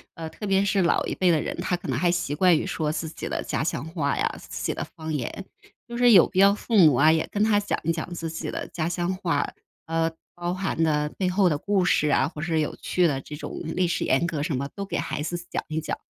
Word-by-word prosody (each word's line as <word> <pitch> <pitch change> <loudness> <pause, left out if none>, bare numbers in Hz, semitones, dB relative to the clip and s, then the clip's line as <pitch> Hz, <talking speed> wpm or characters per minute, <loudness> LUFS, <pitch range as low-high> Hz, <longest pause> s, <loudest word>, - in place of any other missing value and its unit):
呃， 165 -1 -6
特 210 - -6
别 195 0 +3
是 195 0 +2
老 170 - +2
一 - - -2
辈 185 - +2
的 165 -3 +4
人， - - -3
他 180 - 0
可 175 - -9
能 - - -1
还 175 - +2
习 175 -4 -1
惯 175 +1 +4
于 - - -2
说 155 -1 -1
自 155 +1 -3
己 - - -6
的 - - -2
家 - - -2
乡 135 - -2
话 160 -4 -1
呀、 - - +1
自 - - -7
己 - - 0
的 - - -4
方 160 -1 -7
言。 150 +8 -4 0.4
就 235 - -7
是 245 -1 +6
有 180 - +8
必 185 - -2
要 200 +1 +6
父 230 - -3
母 155 -7 +7
啊， 155 +5 +5
也 160 0 +1
跟 205 - +1
他 215 -1 +4
讲 205 - -2
一 165 - +1
讲 165 +1 -4
自 165 -1 -4
己 165 - -5
的 - - -4
家 165 -1 -2
乡 175 +1 -1
话。 165 -6 0 0.4
呃， 165 0 0 0.2
包 175 0 -3
含 190 -3 -2
的 150 -2 +1
背 185 -2 +1
后 190 +1 +3
的 150 - 0
故 200 0 +1
事 150 - +3
啊， 140 - +3
或 150 - -8
是 160 -1 0
有 150 - -3
趣 180 - +1
的 145 -5 +1
这 150 - -8
种 150 0 -7
历 180 +3 0
史 170 - -1
沿 - - +2
革 165 -4 -2
什 150 -1 -1
么， 140 +2 -2
都 200 - -4
给 - - -3
孩 155 -1 -3
子 165 +3 -3
讲 - - -1
一 155 0 -2
讲。 160 - -3
165 Hz, 295 characters per minute, -25 LUFS, 155-185 Hz, 0.4 s, 有